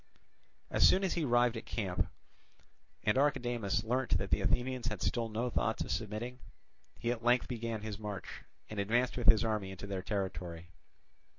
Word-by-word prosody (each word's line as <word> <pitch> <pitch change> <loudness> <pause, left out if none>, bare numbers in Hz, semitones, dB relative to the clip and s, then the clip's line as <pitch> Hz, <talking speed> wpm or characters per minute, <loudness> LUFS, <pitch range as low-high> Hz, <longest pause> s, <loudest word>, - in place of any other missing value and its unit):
As - - 0
soon 190 - +3
as 190 - +1
he 165 -3 0
arrived 120 -1 +3
at 115 - -5
the - - -14
camp, 95 -6 0 1.0
and 105 +5 +3
Archidamus 120 -8 +1
learnt 125 -3 +1
that 100 +2 -4
the - - +3
Athenians 125 +3 0
had 105 -4 -2
still 115 +5 0
no 115 +3 -1
thoughts 110 - 0
of - - -5
submitting, 115 +3 -3 0.6
he 120 - -1
at 120 -1 -4
length 120 +1 +4
began 115 -3 -3
his 110 -1 -5
march, 105 -3 -6 0.3
and 110 - -5
advanced 120 +5 +2
with 120 -2 -2
his 110 0 +7
army 105 -3 -1
into 95 +1 -7
their 100 -2 -3
territory. 90 -4 -4
110 Hz, 180 wpm, -33 LUFS, 100-120 Hz, 1.0 s, his